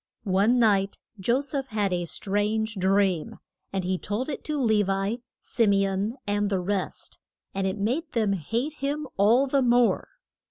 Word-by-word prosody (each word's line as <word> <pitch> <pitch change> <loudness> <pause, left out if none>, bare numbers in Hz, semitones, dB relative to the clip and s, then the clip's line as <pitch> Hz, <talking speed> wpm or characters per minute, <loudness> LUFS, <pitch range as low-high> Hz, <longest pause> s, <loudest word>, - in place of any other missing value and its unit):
One 205 +4 +3
night 200 -4 +3 0.2
Jo 235 +8 +2
seph 280 -1 -3
had 205 -3 -1
a 175 -1 -1
strange 210 +5 -1
dream, 190 -3 +1 0.3
and 195 -1 -2
he 185 0 -1
told 215 +8 -3
it 285 - -4
to 300 -1 -1
Le 220 -5 +3
vi, 195 +4 -1 0.2
Sim 220 -4 +1
e 195 0 +3
on, 195 +4 -1
and 205 0 0
the 195 -2 0
rest, 190 +1 -3 0.3
and 195 0 -1
it 190 +2 -2
made 255 +11 -1
them 215 -4 +2
hate 230 - -2
him 295 +1 -3
all 225 +7 +5
the 275 0 +1
more. 245 -1 +3
205 Hz, 170 wpm, -26 LUFS, 195-245 Hz, 0.3 s, all